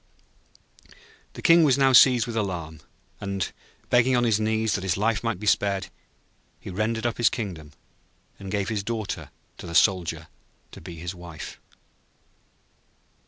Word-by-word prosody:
The - - -10
King 170 -1 +6
was 140 -4 +4
now 135 -1 +4
seized 125 -2 +7
with 115 - -6
alarm, 85 -7 -3 0.4
and, 100 -2 -3 0.4
begging 120 +1 +4
on 120 - +2
his 110 -3 +2
knees 110 0 0
that 95 - -2
his 95 -2 0
life 110 +2 0
might 115 -5 -2
be 105 - -7
spared, 100 -1 +1 0.7
he - - -8
rendered 110 +4 -2
up 120 - -1
his 120 - +4
kingdom 85 - -6 0.7
and 95 - -8
gave 100 -1 -1
his 110 -3 -1
Daughter 110 0 -4 0.3
to - - -8
the 85 - -6
Soldier 85 -2 +2 0.4
to - - -12
be 85 - -9
his 85 +2 -6
wife. 85 -3 -9
105 Hz, 155 wpm, -25 LUFS, 90-115 Hz, 0.7 s, seized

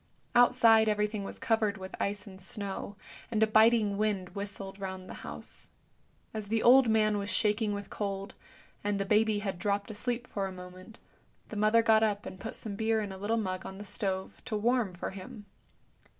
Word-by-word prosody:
Outside 225 -2 +6
everything 210 0 0
was - - -7
covered 215 -2 +1
with 190 0 -8
ice 205 +2 -2
and 190 -2 -12
snow, 200 +1 -5 0.3
and 220 -1 +2
a - - +7
biting 220 -1 +4
wind 205 -4 0
whistled 200 -1 -6
round 190 -1 -6
the - - -8
house. - - -9 0.6
As 215 -2 -5
the 225 +1 0
old 250 0 +7
man 215 -1 +3
was 200 0 -3
shaking 210 +1 +2
with 200 -1 -7
cold, 195 -1 -4 0.5
and 205 -1 0
the 195 - 0
baby 215 +1 +3
had 190 -3 -3
dropped 200 +3 -1
asleep 240 +3 -2
for 200 -5 -3
a - - -6
moment, 185 +4 -11 0.5
the - - -7
mother 215 +2 +4
got 220 -1 +5
up 210 -2 0
and 185 - -8
put 225 - -5
some 210 -3 -4
beer 220 +1 +1
in 205 -2 -3
a 190 - -7
little 215 +3 0
mug 185 -4 -2
on 190 - -8
the 205 - -8
stove 190 -2 -3
to 220 -4 -2
warm 225 -3 +1
for 175 - -4
him. 195 +2 -9
205 Hz, 195 wpm, -30 LUFS, 195-220 Hz, 0.6 s, a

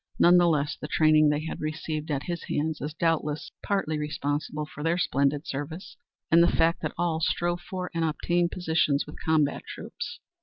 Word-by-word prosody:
None 175 +1 +6
the 175 -1 +5
less 150 -2 +1
the 150 - -7
training 155 -1 +4
they 150 +1 0
had - - -5
received 155 0 -3
at 140 -2 -1
his 175 -1 -4
hands 155 +1 -2
is 150 +2 -4
doubtless 160 -2 0
partly 175 -7 -1
responsible 150 0 -2
for 150 - -10
their 165 +3 +1
splendid 140 -3 +1
service 145 +6 -6 0.4
and 165 +1 +7
the 170 - +6
fact 165 +1 +2
that - - -3
all 165 -2 0
strove 175 +2 0
for 180 +2 -5
and 165 -1 0
obtained 170 +2 +1
positions 160 -5 +1
with 150 - -11
combat 155 -3 +2
troops. 475 - -7
155 Hz, 185 wpm, -27 LUFS, 150-170 Hz, 0.4 s, and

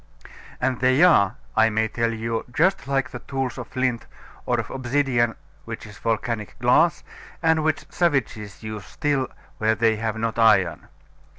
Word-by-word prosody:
And 125 -1 0
they 130 +5 +4
are, 115 - +5 0.2
I 110 0 +5
may 110 0 +1
tell 115 +1 -1
you, 115 0 -3
just 190 +6 +1
like 135 -1 0
the 120 - -6
tools 135 -2 -4
of 125 - -6
flint, 125 -2 -2 0.4
or - - +1
of - - -5
obsidian, 125 -2 +1 0.3
which - - -7
is 105 -1 -12
volcanic 115 -1 -2
glass, 140 +7 +3 0.4
and 160 -1 +3
which 155 -1 0
savages 120 - -1
use 110 -2 -6
still 140 -1 -1 0.3
where 110 0 +2
they 110 0 +2
have 110 0 -2
not 115 +1 -2
iron. 95 -6 +3
120 Hz, 160 wpm, -23 LUFS, 110-135 Hz, 0.4 s, are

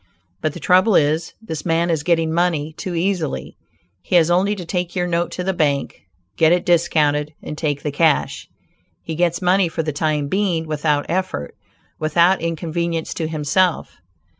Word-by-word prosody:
But 155 - -1
the 175 - -8
trouble 185 +7 +4
is, 155 +2 +1
this 160 -8 -5
man 170 0 +1
is 160 -3 0
getting 165 -1 +1
money 165 -3 0
too 170 +2 -5
easily. 165 - -2 0.5
He 180 - -2
has 170 -1 +5
only 195 +4 +2
to 180 -3 -7
take 180 +1 -3
your 180 -1 0
note 170 0 0
to 180 - -4
the 190 +1 0
bank, 145 - -1 0.3
get 160 0 +4
it 175 0 +2
discounted 150 -3 +2
and 150 - -6
take 145 -2 -2
the 150 - -2
cash. 155 +1 +1 0.6
He 165 - -5
gets 170 +2 0
money 185 +1 +3
for 165 0 -3
the 155 -1 -3
time 150 -1 0
being 180 -2 0
without 150 -1 0
effort; 175 - -2 0.5
without 170 +4 +3
inconvenience 165 0 -2
to 160 - -3
himself. 160 +3 0
165 Hz, 170 wpm, -20 LUFS, 155-175 Hz, 0.6 s, has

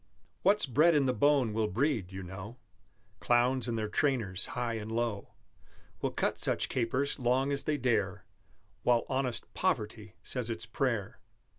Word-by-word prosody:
What's 205 +1 +3
bred 155 +6 +4
in 145 -2 +4
the 130 - +2
bone 130 -2 +3
will 110 0 +1
breed, 115 -5 0
you 95 0 -6
know; 95 +6 -8 0.6
Clowns 125 +1 +2
and 115 -1 -1
their 110 -1 -1
trainers, 110 -6 0
high 120 -1 -1
and 110 -1 -5
low, 115 -3 -2 0.7
Will - - +1
cut - - -1
such - - 0
capers, 130 +3 0
long 130 +3 +2
as 140 0 0
they 150 -1 +1
dare, 105 -7 0 0.6
While 120 -1 +3
honest 130 -2 -2
Poverty 110 - -2
says 125 -3 -3
its 110 -1 -4
prayer. 110 -3 -2
120 Hz, 155 wpm, -31 LUFS, 110-135 Hz, 0.7 s, bred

